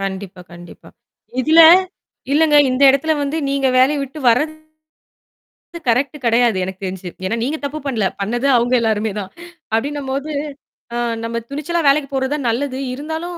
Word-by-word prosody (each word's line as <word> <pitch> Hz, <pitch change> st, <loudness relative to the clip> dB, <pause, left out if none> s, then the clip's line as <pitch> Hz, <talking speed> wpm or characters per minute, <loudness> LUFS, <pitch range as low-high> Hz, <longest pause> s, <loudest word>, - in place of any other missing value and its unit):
கண்டிப்பா, 190 Hz, -1 st, -6 dB
கண்டிப்பா. 175 Hz, 0 st, -13 dB, 0.5 s
இதுல 315 Hz, +5 st, +5 dB, 0.7 s
இல்லைங்க 300 Hz, 0 st, +4 dB
இந்த 255 Hz, +2 st, -1 dB
இடத்துல 295 Hz, +4 st, +1 dB
வந்து 285 Hz, +3 st, -2 dB
நீங்க 275 Hz, -1 st, 0 dB
வேலையை 280 Hz, +3 st, +3 dB
விட்டு 275 Hz, +3 st, -8 dB
வர்றது 310 Hz, +6 st, -1 dB, 1.2 s
கரெக்ட் 270 Hz, +6 st, +1 dB
கிடையாது 235 Hz, -2 st, +3 dB
எனக்கு 190 Hz, +1 st, -7 dB
தெரிஞ்சு. 185 Hz, -1 st, -6 dB, 0.2 s
ஏன்னா 190 Hz, -, -1 dB
நீங்க 290 Hz, +6 st, -2 dB
தப்பு 290 Hz, +2 st, -4 dB
பண்ணல, 230 Hz, -7 st, -1 dB, 0.2 s
பண்ணது 240 Hz, +7 st, -1 dB
அவங்க 240 Hz, +2 st, 0 dB
எல்லாருமே 220 Hz, -1 st, 0 dB
தான். 195 Hz, -2 st, -7 dB, 0.4 s
அப்படின்னும்போது, 275 Hz, +4 st, -2 dB, 0.6 s
ஆ. -, -, -1 dB, 0.3 s
நம்ம 230 Hz, 0 st, -3 dB
துணிச்சலா 305 Hz, +5 st, -2 dB
வேலைக்கு 280 Hz, 0 st, +3 dB
போறது 265 Hz, 0 st, -1 dB
தான் 280 Hz, -5 st, -3 dB
நல்லது. 260 Hz, +3 st, -2 dB, 0.2 s
இருந்தாலும் 320 Hz, +5 st, -5 dB
265 Hz, 145 wpm, -18 LUFS, 225-295 Hz, 1.2 s, இதுல